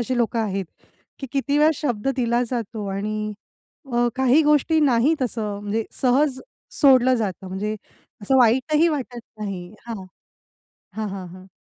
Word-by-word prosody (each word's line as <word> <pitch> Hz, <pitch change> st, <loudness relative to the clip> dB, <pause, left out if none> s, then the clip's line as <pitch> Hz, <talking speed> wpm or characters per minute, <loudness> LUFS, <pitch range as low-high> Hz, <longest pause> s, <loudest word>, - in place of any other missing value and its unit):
असे 250 Hz, +2 st, -1 dB
लोकं 235 Hz, 0 st, 0 dB
आहेत, 195 Hz, -3 st, -2 dB, 0.5 s
की 270 Hz, -, -6 dB
किती 280 Hz, +1 st, 0 dB
वेळा 305 Hz, +1 st, +5 dB
शब्द 250 Hz, -4 st, -2 dB
दिला 240 Hz, -1 st, +1 dB
जातो 225 Hz, -4 st, -4 dB
आणि 215 Hz, +2 st, -3 dB, 0.6 s
अ, 240 Hz, 0 st, +2 dB
काही 265 Hz, +4 st, +4 dB
गोष्टी 300 Hz, +2 st, +3 dB
नाहीत 275 Hz, +2 st, +3 dB
असं 210 Hz, -4 st, -2 dB
म्हणजे 210 Hz, +2 st, -2 dB, 0.2 s
सहज 260 Hz, +1 st, +2 dB, 0.4 s
सोडलं 260 Hz, -3 st, +6 dB
जातं, 195 Hz, -5 st, -3 dB
म्हणजे 210 Hz, +3 st, -3 dB, 0.5 s
असं 265 Hz, +6 st, +2 dB
वाईटही 265 Hz, +8 st, +4 dB
वाटत 255 Hz, -5 st, -4 dB, 0.2 s
नाही. 185 Hz, -4 st, -5 dB, 0.2 s
हां, 220 Hz, -5 st, -6 dB, 0.9 s
हां, 215 Hz, -1 st, -3 dB
हां, 190 Hz, -2 st, -6 dB
हां. 185 Hz, +2 st, -13 dB
235 Hz, 145 wpm, -23 LUFS, 210-265 Hz, 0.9 s, सोडलं